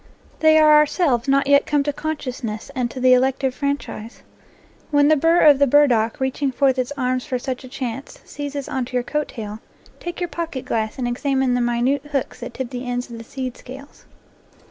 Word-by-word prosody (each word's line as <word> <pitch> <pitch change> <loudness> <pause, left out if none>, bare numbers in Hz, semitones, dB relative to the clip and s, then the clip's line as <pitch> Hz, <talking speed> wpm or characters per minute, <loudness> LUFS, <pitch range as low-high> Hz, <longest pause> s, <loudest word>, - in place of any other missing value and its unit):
They 315 0 +5
are 305 -1 +6
ourselves 295 -5 +2
not 275 +1 +3
yet 280 0 +4
come 290 -1 +2
to 290 0 -2
consciousness 255 -7 -5
and 250 -3 -1
to 255 - -8
the 255 0 +5
elective 265 +1 +2
franchise. 280 -5 -4 0.7
When 290 -1 +4
the 310 - +6
burr 330 +4 +3
of 290 -3 +6
the 280 - +4
bur 290 +3 +6
dock, 230 -4 0
reaching 265 +1 -1
forth 265 0 +2
its 255 +2 -2
arms 255 -1 0
for 265 -4 -2
such 255 +1 -5
a - - -9
chance, 255 0 -6
seizes 285 -1 -6
on 260 -2 -2
to 250 - -13
your 250 -1 0
coat 300 +3 -2
tail, 215 -3 -7 0.4
take 345 0 -6
your 350 - -1
pocket 320 -3 -5
glass 220 -1 -2
and 250 -2 -2
examine 265 +1 0
the 245 - +1
minute 240 +3 +1
hooks 275 -3 -2
that - - -8
tip 260 -1 -5
the 250 0 -5
ends 245 0 -3
of 230 - -8
the - - -8
seed 255 +1 -5
scales. 270 +3 -12
265 Hz, 210 wpm, -21 LUFS, 245-285 Hz, 0.7 s, are